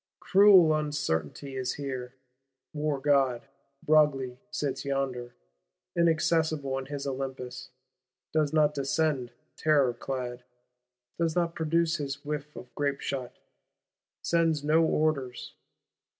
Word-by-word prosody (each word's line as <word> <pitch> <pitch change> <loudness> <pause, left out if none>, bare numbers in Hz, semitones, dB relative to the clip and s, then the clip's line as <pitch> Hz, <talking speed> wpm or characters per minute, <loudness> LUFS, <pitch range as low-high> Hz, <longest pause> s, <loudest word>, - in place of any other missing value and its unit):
Cruel 190 -5 +6
uncertainty 140 - -2
is 130 -1 -2
here: 130 -3 -5 0.6
war 150 -2 -1
god 135 -4 +2 0.4
Broglie 140 -5 +3
sits 135 -8 -3
yonder, 135 -3 -3 0.6
inaccessible 160 -4 +1
in 130 - -7
his 140 -1 -5
Olympus; 130 -1 -5 0.6
does 155 -2 +2
not 150 -1 +3
descend 140 -2 0 0.3
terror 145 -5 +3
clad, 125 0 -5 0.8
does 165 -2 0
not 170 -1 +1
produce 165 +1 +1
his 145 -1 -5
whiff 150 0 -4
of 125 - -11
grapeshot; 140 -3 -2 0.9
sends 165 -3 +1
no 155 +2 +4
orders. 150 -6 -1
145 Hz, 105 wpm, -28 LUFS, 130-155 Hz, 0.9 s, Cruel